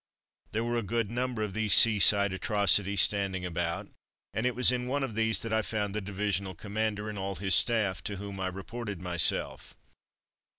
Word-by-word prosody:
There 110 +2 -1
were 120 0 -1
a - - -3
good 115 0 -3
number 120 -2 -3
of 105 -3 -5
these 110 0 +3
sea 110 -2 +8
side 100 0 +5
atrocities 100 0 +3
standing 95 0 0
about, 85 -1 -3 0.5
and 110 +3 -1
it 125 - -2
was 125 +1 +4
in 125 0 -3
one 140 +2 -2
of 125 -4 -4
these 110 0 0
that 115 -1 -4
I 110 - +2
found 105 -2 -3
the 105 - -3
divisional 100 -1 -3
commander 105 +2 -3
and 105 -2 -6
all 95 0 -4
his 95 0 -1
staff, 105 -8 +2
to 100 - -3
whom 100 0 -8
I 95 - -2
reported 100 +2 -7
myself. 90 -2 -1
105 Hz, 195 wpm, -28 LUFS, 95-110 Hz, 0.5 s, sea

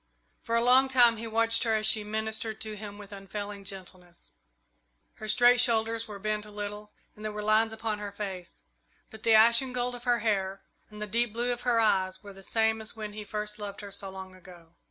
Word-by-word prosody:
For 230 - -2
a 230 - +3
long 260 +2 +5
time 240 -3 +5
he 230 +1 -6
watched 230 +1 +2
her 225 -2 +2
as 215 0 0
she 215 0 +4
ministered 220 +1 -3
to 215 -1 -3
him 205 -1 -8
with 205 -1 -12
unfailing 200 0 -7
gentleness. 185 -2 -9 0.9
Her 215 - -7
straight 245 +2 +6
shoulders 230 -1 +2
were 210 -2 -8
bent 210 +1 -2
a 210 - -12
little 210 0 -7 0.2
and 210 - -12
there 215 - -3
were 210 0 -5
lines 215 +1 +3
upon 220 -1 -3
her 205 -1 -5
face; 190 -4 -6 0.5
but 220 -2 -12
the 225 0 +4
ashen 235 +4 +5
gold 250 0 -1
of 245 +1 -9
her 245 -1 +3
hair 195 -3 -1 0.3
and 210 0 -7
the - - -2
deep 230 +2 0
blue 240 +2 +1
of 240 - -7
her 240 -2 +2
eyes 190 -3 +1
were 200 -1 -10
the 195 - -13
same 220 +2 +1
as 220 - -4
when 215 -2 -6
he 215 0 -6
first 210 0 -4
loved 200 -1 -6
her 200 -1 -9
so 195 0 -3
long 190 0 -9
ago. 175 -3 -16
215 Hz, 220 wpm, -29 LUFS, 205-230 Hz, 0.9 s, straight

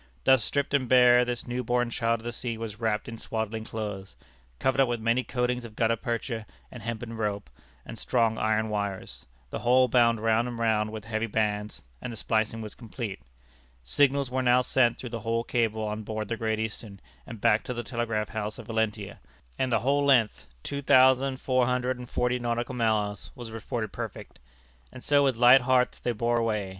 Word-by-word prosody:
Thus 130 -4 +5
stripped 140 +5 -1
and 130 -4 +1
bare 125 -1 +6
this 120 -1 -3
new 125 +1 -2
born 120 0 0
child 115 -1 0
of - - -17
the 120 - -4
sea 120 -1 -4
was 110 -1 -6
wrapped 110 -2 -1
in 115 -1 -7
swaddling 110 0 -3
clothes, 105 -4 -6 0.4
covered 130 - +2
up 135 - +4
with 120 -1 -2
many 115 +3 +1
coatings 125 0 -1
of 115 -2 -10
gutta 115 0 +2
percha, 115 -1 -4 0.2
and 125 - -9
hempen 115 +1 -5
rope, 105 -2 -3 0.3
and - - -8
strong 115 -2 +1
iron 110 0 +1
wires, 100 -2 -4 0.2
the - - -3
whole 125 +1 +4
bound 115 -2 +3
round 115 +2 +2
and 120 -1 -5
round 110 -2 +1
with 110 -1 -7
heavy 115 0 -2
bands, 105 -1 -2 0.2
and 125 - -5
the 115 - -8
splicing 110 +1 -1
was 105 - -7
complete. 115 - -6 0.6
Signals 140 - +2
were 130 0 0
now 125 0 +4
sent 120 -2 +2
through 125 - -7
the 115 - -4
whole 115 +1 -1
cable 110 -2 0
on 105 0 -3
board 110 0 -5
the 115 - -1
Great 110 -1 -1
Eastern 110 -2 -5 0.3
and 115 - -8
back 105 +2 +3
to 125 - -5
the 120 - -3
telegraph 115 -4 -2
house 105 -1 -4
at - - -9
Valentia, 110 -3 -2 0.4
and 130 -1 0
the - - +2
whole 140 +3 +2
length, 115 - +2 0.2
two 140 0 -4
thousand 130 0 +4
four 130 -3 +1
hundred 125 0 -1
and 125 -1 -9
forty 125 0 0
nautical 120 +1 -2
miles, 110 -4 -1
was 120 -2 -8
reported 110 -1 -4
perfect. - - -7 0.5
And 130 - -11
so 145 -1 +4
with 135 -3 +2
light 125 +3 +7
hearts 125 0 +2
they 120 - -1
bore 120 +1 0
away. 105 -4 -1
115 Hz, 200 wpm, -27 LUFS, 110-125 Hz, 0.6 s, light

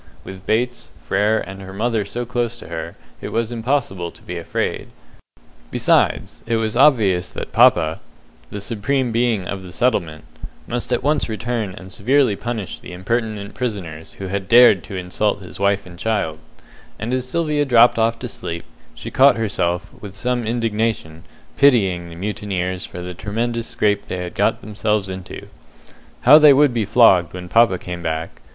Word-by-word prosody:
With 95 0 -11
Bates, 120 +3 -1
Frere, 105 +3 +1
and 95 0 -8
her 95 0 -9
mother 110 +1 0
so 120 +5 -4
close 120 -1 -2
to - - -11
her, 85 0 -6 0.3
it - - -5
was 115 0 -1
impossible 115 -7 -1
to - - -18
be 90 - -6
afraid; 85 - -3 0.8
besides, - - +1
it 115 - +1
was 110 -1 -1
obvious 110 -10 +3
that - - -6
papa - - +4 0.5
the 105 - -6
Supreme 115 +5 -1
Being 115 -5 0
of 100 -1 -4
the 90 -1 -10
settlement 85 -8 -1 0.4
must 120 +1 -4
at 120 - 0
once 150 -3 +1
return 110 -3 -3
and 95 0 -11
severely 125 +1 +2
punish 115 -2 -4
the - - -10
impertinent 105 +2 -3
prisoners 95 -11 -5
who 95 - -8
had 95 0 -3
dared 120 -6 +7
to 100 - -8
insult 95 +3 -1
his 90 - -11
wife 100 0 +1
and 90 -1 -13
child, 100 -9 -1 0.6
and 110 +4 -4
as 130 0 -2
Sylvia 150 -1 0
dropped 120 -3 +5
off 115 +1 +2
to 125 - -6
sleep, 85 -6 -6 0.3
she - - -8
caught 135 -1 +5
herself, 100 -4 -1
with 100 -2 -9
some 120 +2 -2
indignation, 110 -8 -2 0.3
pitying 95 -11 +3
the 85 - -10
mutineers 95 -1 -3
for 90 - -8
the 90 0 -6
tremendous 115 +5 -3
scrape 105 -1 0
they 90 - -4
had 90 -1 -5
got - - +1
themselves 105 -2 -1
into. 95 -1 -8 0.8
How 145 +5 +8
they 150 -2 +8
would 140 -1 +4
be 115 -3 0
flogged 95 -7 +4
when 90 -1 -7
papa 115 -1 +4
came 90 -1 -7
back! 80 0 -4
105 Hz, 170 wpm, -20 LUFS, 95-120 Hz, 0.8 s, How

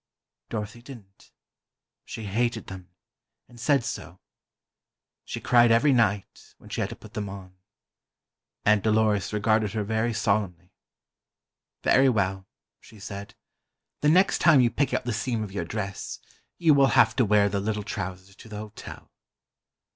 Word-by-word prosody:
Dorothy 110 +1 -5
didn't. 115 -7 -14 0.7
She 110 - -7
hated 115 +3 -1
them, 95 -1 -10 0.6
and 120 - -16
said 140 +1 +2
so. 90 -4 -6 1.1
She - - -5
cried 120 -1 +4
every 125 +5 +4
night, 105 -5 -1
when - - -16
she - - -2
had - - -1
to - - -7
put - - -15
them 105 -2 -4
on. 95 -1 -10 1.1
Aunt 105 -1 +4
Dolores 110 -3 +2
regarded 105 0 +1
her 110 -2 -1
very 110 +3 0
solemnly. 100 -5 -1 1.1
"Very 135 +1 +5
well," 95 -4 -1 0.3
she 110 - -17
said, 100 0 -8 0.7
"the 150 - +3
next 185 +5 +4
time 160 -5 +6
you 120 -2 +4
pick 140 -1 0
out - - -1
the 120 - -1
seam 115 0 -2
of 105 - -7
your 95 -4 -3
dress, 100 +1 -5 0.4
you 165 -3 +4
will 140 -1 +5
have 110 -1 +5
to 130 - +4
wear 105 -1 +4
the 100 0 -1
little 105 +1 -2
trousers 95 -2 -6
to 110 - -14
the 105 - -7
hotel." 105 0 -10
105 Hz, 155 wpm, -26 LUFS, 100-120 Hz, 1.1 s, time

